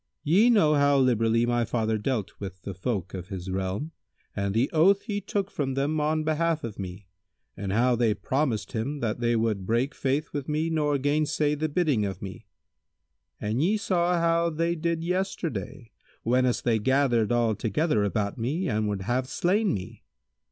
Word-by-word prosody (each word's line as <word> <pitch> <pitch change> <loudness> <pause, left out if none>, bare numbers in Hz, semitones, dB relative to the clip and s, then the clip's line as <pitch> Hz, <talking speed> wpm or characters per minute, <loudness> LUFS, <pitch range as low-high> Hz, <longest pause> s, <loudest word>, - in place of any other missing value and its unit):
Ye 195 +11 +4
know 200 -10 +5
how 145 -1 +4
liberally 115 -3 +3
my 120 0 +1
father 110 -1 -1
dealt 110 -3 -2
with 95 -2 -8
the 100 - -5
folk 95 -1 -3
of 90 -2 -6
his 95 -2 -6
realm 95 +11 -3 0.4
and 100 0 -2
the 120 +4 +3
oath 190 +5 +4
he 205 -3 -3
took 200 0 -2
from 135 -3 -2
them 145 +3 0
on 155 +1 +1
behalf 160 +1 0
of 110 -3 -6
me 95 +1 -7 0.5
and 100 -1 -4
how 120 +4 +3
they 115 -3 +2
promised 125 -8 -1
him 135 +6 -3
that 115 0 -1
they 120 -1 +1
would 110 -4 -1
break 120 +6 +1
faith 140 +3 -1
with 145 0 -4
me 155 +2 0
nor 150 -2 +1
gainsay 150 +1 +1
the 155 +1 -1
bidding 145 -8 +1
of 95 -2 -3
me; 100 +2 -9 0.9
and 110 +5 -1
ye 200 +7 +2
saw 180 -4 +1
how 170 0 +2
they 165 +1 0
did 170 0 -2
yesterday, 170 - -3 0.3
whenas 125 +1 +2
they 115 -2 +2
gathered 120 -2 +2
all 120 -2 +2
together 110 - 0
about 100 +1 -1
me 150 +11 -1
and 110 -3 0
would 100 -2 -3
have 125 +5 -1
slain 195 +7 +1
me. 95 - -5
130 Hz, 180 wpm, -27 LUFS, 110-155 Hz, 0.9 s, know